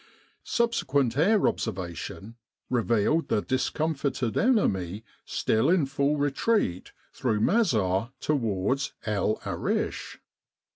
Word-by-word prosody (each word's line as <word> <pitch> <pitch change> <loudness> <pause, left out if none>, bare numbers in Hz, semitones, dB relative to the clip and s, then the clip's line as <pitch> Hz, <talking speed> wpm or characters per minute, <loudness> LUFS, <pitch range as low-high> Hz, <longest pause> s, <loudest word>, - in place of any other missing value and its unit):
Subsequent 140 - +1
air 200 +8 +4
observation 95 +4 -4 0.4
revealed 120 +6 +2
the 105 - 0
discomfited 135 -2 -1
enemy 105 - +1 0.2
still 110 +7 +1
in 175 -4 +3
full 140 +2 0
retreat 145 - 0 0.2
through 105 - 0
Mazar 110 - +2
towards 130 -1 0
El 105 0 0
Arish. - - -2
130 Hz, 90 wpm, -27 LUFS, 105-155 Hz, 0.4 s, air